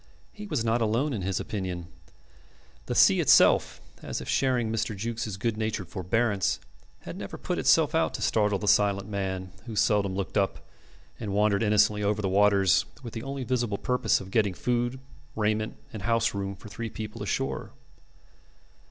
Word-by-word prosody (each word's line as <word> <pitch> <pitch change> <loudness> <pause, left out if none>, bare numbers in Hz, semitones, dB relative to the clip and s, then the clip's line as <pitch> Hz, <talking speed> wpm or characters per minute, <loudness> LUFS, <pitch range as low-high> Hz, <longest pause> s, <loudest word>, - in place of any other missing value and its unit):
He 210 0 -8
was 145 - -1
not 115 +1 +1
alone 115 +7 +1
in 105 - -3
his 95 +1 -1
opinion. 90 -4 -4 1.0
The - - -2
sea - - +6
itself, - - +5 0.2
as - - -4
if - - -8
sharing 125 -4 +1
Mr. 110 -2 -2
Jukes' 110 -1 -4
good 110 +1 -1
natured 110 -5 -3
forbearance, 100 +3 0 0.4
had - - -8
never - - -7
put - - -3
itself - - +4
out - - +1
to - - -6
startle 105 -2 +2
the 105 - -5
silent 100 -1 +3
man, 95 -3 -3 0.2
who 110 - -6
seldom 100 -2 +2
looked 100 +2 -1
up, 95 - -2 0.5
and 105 -4 -4
wandered 105 0 +2
innocently 105 -1 +3
over 105 +1 0
the 100 - -1
waters 100 -1 +4 0.2
with 115 - -7
the 115 - -5
only 135 +1 -5
visible 120 -4 -1
purpose 125 +3 +1
of 95 0 -10
getting 105 -4 +1
food, 120 +3 -1 0.4
raiment, 110 0 -1 0.2
and 110 - -6
house 115 +2 +1
room 100 0 -3
for 105 - -13
three 115 +2 -5
people 110 -1 -7
ashore. - - -2
105 Hz, 170 wpm, -27 LUFS, 100-115 Hz, 1.0 s, sea